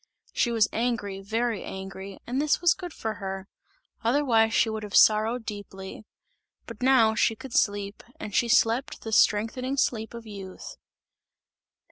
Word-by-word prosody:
She 240 - +1
was 225 -2 +3
angry, 220 -5 -2
very 225 +1 -1
angry, 190 0 -8
and 255 +3 -1
this 300 -1 +2
was 345 -2 +4
good 355 -3 -8
for 220 -7 -5
her; 190 0 -5 0.6
otherwise 230 -3 +3
she 230 - +3
would 220 0 -3
have 210 -1 -6
sorrowed 220 +2 +4
deeply; 200 0 -8 0.6
but 230 -1 -10
now 250 -4 +5
she 225 +1 +2
could 255 +2 -10
sleep, 200 -1 0 0.2
and 205 - -7
she 240 - +2
slept 230 +3 +2
the 225 - -5
strengthening 230 +6 +2
sleep 225 -3 -1
of 235 0 -9
youth. 195 -3 -9
220 Hz, 150 wpm, -26 LUFS, 205-240 Hz, 0.6 s, now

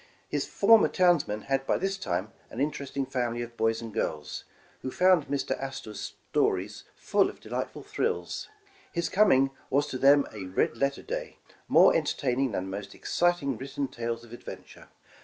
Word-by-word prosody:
His - - -2
former 220 +2 +6
townsman 170 - +2
had 135 0 -1
by - - +2
this 195 +1 -1
time 95 - -3 0.2
an 115 - -8
interesting 140 -1 -2
family 120 -2 -2
of 120 0 -10
boys 115 0 0
and 115 -2 -7
girls, 75 -8 -3 0.4
who 130 - -3
found 180 +1 +4
Mr. 140 - -2
Astor 135 -5 -6
's 100 - -6 0.2
stories 105 +4 0
full 205 -1 +2
of - - -12
delightful - - -5
thrills. - - -2 0.4
His 170 -1 -1
coming 160 -10 +4 0.2
was 140 +2 +2
to 130 - -4
them 140 +1 +6
a 100 -3 -6
red 95 +5 0
letter 140 +3 -1
day, - - -5 0.3
more - - +6
entertaining 130 -1 0
than 95 - -1
the 95 +1 -4
most 100 -1 -9
exciting 175 -8 0
written 135 +1 -3
tales 115 -2 -4
of 120 0 -13
adventure. 120 - -10
135 Hz, 170 wpm, -28 LUFS, 115-150 Hz, 0.4 s, former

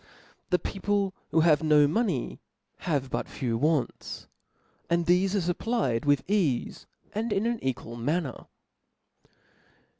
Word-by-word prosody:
The 180 - +4
people 195 +2 -1 0.2
who 160 - +3
have 155 -3 +4
no 150 -2 +5
money, 170 - -1 0.5
have 135 -4 0
but - - -2
few 120 -5 -2
wants; 150 +2 -1 0.6
and 170 0 +2
thefe 185 +3 +3
are 175 -3 +1
fupplied 175 - -1
with 145 -2 +3
eafe, 175 - 0 0.3
and 220 +2 -2
in 205 +2 +1
an 235 -1 -1
equal 125 -3 -3
manner. 145 +3 -2
165 Hz, 125 wpm, -28 LUFS, 140-195 Hz, 0.6 s, no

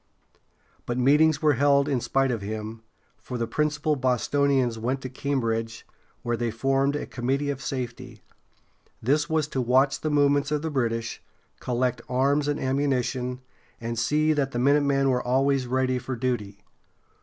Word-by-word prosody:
But 120 - -2
meetings 150 +4 +4
were 150 -1 +5
held 140 +2 +3
in 135 -4 0
spite 135 +1 +1
of 115 -4 -2
him, 110 +2 -5 0.4
for 125 - -6
the 115 - -1
principal 150 +4 0
Bostonians 130 -1 +1
went 125 +4 -1
to 130 - -5
Cambridge, 115 -4 -2 0.4
where 120 0 0
they 120 0 -1
formed 135 +5 +1
a 145 - -3
Committee 135 +4 -1
of 135 -1 -6
Safety. 125 -4 -6 0.8
This 150 +6 +1
was 160 -2 +1
to 130 - -1
watch 130 +3 +2
the 155 - -1
movements 145 0 +2
of 150 0 -1
the 160 - -2
British, 115 -4 -2 0.4
collect 125 0 -1
arms 140 +3 +2
and 145 0 -1
ammunition, 130 -2 -1 0.4
and 115 0 -3
see 155 +6 +2
that 140 -3 0
the - - -2
minutemen 140 +1 +3
were 125 -1 +1
always 135 +1 +1
ready 130 0 0
for 130 +1 -5
duty. 110 -5 -3
130 Hz, 155 wpm, -25 LUFS, 120-145 Hz, 0.8 s, were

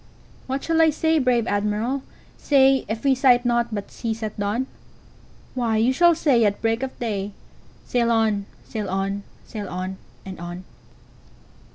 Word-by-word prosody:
"What 265 +1 -2
shall 325 0 +2
I 320 - +6
say, 320 +1 +2
brave 250 -4 +2
Admiral, 210 +6 0 0.3
say, 270 -2 +4
If 220 +1 -4
we 275 -1 +4
sight 250 -2 +4
naught 240 -1 +2
but 205 -2 -5
seas 225 -1 -4
at 215 -1 -5
dawn?""Why, 230 +1 -4
you 235 +4 +3
shall 345 +4 +5
say 275 -7 +3
at 205 -1 +1
break 225 +1 0
of 265 -1 -4
day,'Sail 220 +2 -4
on! 220 -3 +1 0.2
sail 210 -3 -5
on! 195 +1 -1 0.2
sail 205 -4 -6
on! 185 +1 -4 0.3
and 190 -2 -8
on! 175 +1 -7
230 Hz, 150 wpm, -23 LUFS, 205-260 Hz, 0.3 s, I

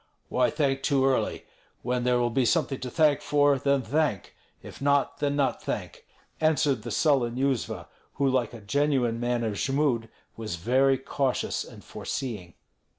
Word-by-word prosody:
"Why 125 -1 +2
thank 140 -3 0
too 135 -1 +2
early? 135 -1 0 0.4
When 125 0 -1
there 125 0 +3
will 120 -1 +1
be 130 +3 +2
something 140 0 +1
to 125 - -5
thank 150 +1 +3
for, 145 -2 +3
then 140 -1 +1
thank; 145 - -1 0.3
if - - -11
not, 140 0 +1
then 145 -1 0
not 135 -4 0
thank," - - -5 0.3
answered 150 -5 +2
the - - -6
sullen 130 -6 +2
Yuzva, 115 - -1 0.3
who, 140 - +1
like 130 -3 +1
a 115 - -10
genuine 125 0 +1
man 120 0 0
of 110 -2 -1
Jmud, 135 -5 0 0.3
was 110 -5 -4
very 130 +9 +3
cautious 135 0 -1
and - - -13
foreseeing. 105 -11 -5
135 Hz, 160 wpm, -27 LUFS, 120-140 Hz, 0.4 s, there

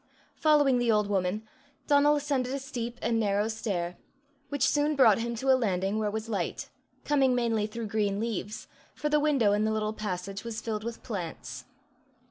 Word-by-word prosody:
Following 290 -5 +4
the 240 -1 +2
old 210 -1 +3
woman, 200 +2 -1 0.4
Donal 290 0 +5
ascended 275 -3 -1
a - - -1
steep 245 -3 -5
and 230 -1 +1
narrow 205 0 +1
stair, 195 -6 -3 0.5
which 285 -3 +1
soon 295 +1 +2
brought 235 -7 +6
him 235 +1 -2
to 265 +3 +1
a - - +7
landing 200 -4 0
where 215 -1 0
was 220 +2 -4
light, 200 -6 -3 0.4
coming 270 -3 +3
mainly 225 -3 +1
through 230 +1 -5
green 205 -1 0
leaves, 215 -1 -4 0.3
for 300 - -2
the 300 0 +3
window 275 -9 +3
in 210 +1 +2
the 220 - +1
little 215 0 -1
passage 195 -1 -4
was 230 -1 -4
filled 215 -2 -3
with 235 0 -6
plants. 165 - -6
220 Hz, 180 wpm, -28 LUFS, 205-260 Hz, 0.5 s, a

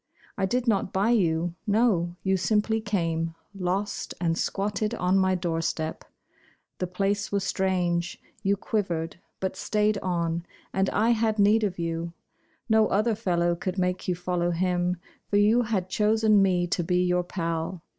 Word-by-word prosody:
I 195 -1 0
did 250 +4 -1
not 200 -4 +1
buy 200 +5 +2
you; 170 -6 +1
no, 200 -6 +2
you 190 0 +2
simply 215 +3 +1
came, 165 -6 -1 0.2
Lost, 195 +2 -2
and 165 -2 +1
squatted 205 +5 -1
on 180 -3 +1
my 190 0 +3
doorstep. 165 -2 -2 0.8
The 180 - -1
place 200 +3 -1
was 200 -1 0
strange 180 -3 0 0.2
you 200 -1 +1
quivered, 170 -6 -2 0.2
but 190 0 -2
stayed 210 +1 +1
on, 170 -2 -1 0.3
And 190 0 +1
I 225 +3 +2
had 220 -1 +1
need 210 +2 +4
of 195 -3 -1
you. 165 0 -3 0.5
No 220 -2 +4
other 215 +3 +2
fellow 175 -5 +1
could 185 +2 -4
make 180 0 -1
you 180 - +1
follow 175 0 -1
him, 180 +1 0 0.3
For 205 - +1
you 215 +4 +5
had 215 -6 -1
chosen 215 +1 +3
me 180 -2 +2
to 175 0 -1
be 180 +2 +1
your 180 0 +2
pal. 165 0 -3
190 Hz, 155 wpm, -26 LUFS, 175-210 Hz, 0.8 s, you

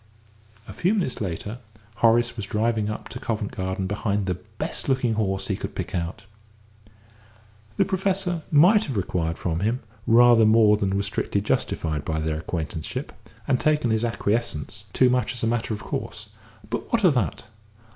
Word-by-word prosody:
A - - -8
few 185 +5 +1
minutes 175 - -1
later 100 +5 -4 0.4
Horace 115 +1 +3
was 105 -4 -5
driving 110 0 0
up 105 - -5
to - - -7
Covent 110 -2 -3
Garden 95 0 -3
behind 105 0 -1
the 90 - 0
best 90 - -5
looking 130 -3 +2
horse 95 -3 -1
he 100 - 0
could - - -6
pick - - -4
out. 85 +5 -3 1.5
The 195 - +4
Professor 190 -2 0
might 185 +9 +6
have 130 -6 -3
required 85 -3 -1
from 85 -2 -2
him 115 +6 0 0.3
rather 120 0 +7
more 110 -1 +6
than 100 -1 0
was 100 - 0
strictly - - -1
justified 75 -3 -1
by 80 -1 -2
their 80 0 -1
acquaintanceship, 80 -2 -4 0.3
and 130 -3 +2
taken 150 -6 +2
his 110 +1 +1
acquiescence 105 -4 -2
too 130 -1 +4
much 125 -2 +1
as 120 - -4
a - - +3
matter 115 0 0
of 105 -1 -4
course - - -5 0.4
but - - -4
what - - +2
of - - +6
that? - - -1
110 Hz, 170 wpm, -24 LUFS, 95-120 Hz, 1.5 s, rather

